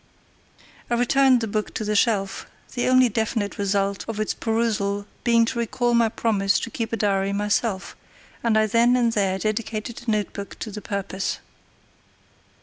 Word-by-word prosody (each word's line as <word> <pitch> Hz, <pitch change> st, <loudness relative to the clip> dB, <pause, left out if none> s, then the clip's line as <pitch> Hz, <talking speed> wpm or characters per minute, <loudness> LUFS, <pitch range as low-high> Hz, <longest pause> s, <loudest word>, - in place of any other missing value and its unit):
I 240 Hz, -, +2 dB
returned 255 Hz, +1 st, +4 dB
the 225 Hz, -, -1 dB
book 210 Hz, 0 st, -3 dB
to -, -, -2 dB
the 210 Hz, 0 st, 0 dB
shelf, 200 Hz, -3 st, +1 dB, 0.3 s
the 245 Hz, -, -1 dB
only 255 Hz, 0 st, +5 dB
definite 220 Hz, -3 st, -2 dB
result 200 Hz, -1 st, 0 dB
of 225 Hz, -2 st, -4 dB
its 215 Hz, -, 0 dB
perusal 215 Hz, -3 st, -1 dB, 0.2 s
being 230 Hz, -1 st, +4 dB
to 235 Hz, +1 st, -3 dB
recall 240 Hz, +1 st, 0 dB
my 235 Hz, -1 st, +4 dB
promise 205 Hz, -3 st, +1 dB
to 230 Hz, -, -5 dB
keep 230 Hz, 0 st, -3 dB
a 230 Hz, -, -1 dB
diary 195 Hz, -1 st, +1 dB
myself, 205 Hz, 0 st, -1 dB, 0.5 s
and 230 Hz, -2 st, +2 dB
I 215 Hz, -, +4 dB
then 235 Hz, +3 st, +3 dB
and 235 Hz, -2 st, +2 dB
there 195 Hz, -3 st, +1 dB
dedicated 215 Hz, +3 st, -3 dB
a -, -, 0 dB
notebook 205 Hz, -2 st, -2 dB
to 220 Hz, -, -4 dB
the 210 Hz, +1 st, -7 dB
purpose. 195 Hz, -2 st, -3 dB
215 Hz, 165 wpm, -24 LUFS, 200-235 Hz, 0.5 s, only